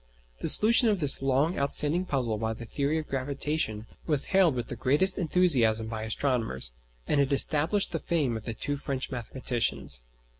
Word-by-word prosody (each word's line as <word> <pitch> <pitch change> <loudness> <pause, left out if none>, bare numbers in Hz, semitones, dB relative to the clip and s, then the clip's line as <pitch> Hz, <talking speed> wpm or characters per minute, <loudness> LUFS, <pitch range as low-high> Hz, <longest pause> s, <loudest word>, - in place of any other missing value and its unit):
The - - 0
solution 230 +2 +7
of 205 -3 0
this 145 -4 +3
long 135 +5 0
outstanding 150 +5 -1
puzzle 120 -9 -2
by 110 0 -2
the 115 - -10
theory 140 +6 -2
of 155 - -5
gravitation 135 -4 -3 0.2
was 150 -3 +2
hailed 185 -7 +3
with 120 -1 -5
the - - -5
greatest 145 +11 +1
enthusiasm 130 -11 +2
by 110 -1 -5
astronomers, 110 - -1 0.4
and 145 - +1
it 140 0 -1
established 155 +8 +3
the 165 - -3
fame 150 -9 -2
of 110 - -8
the 115 - -5
two 145 +5 -4
French 135 -1 -4
mathematicians. 115 - -3
140 Hz, 175 wpm, -27 LUFS, 115-155 Hz, 0.4 s, solution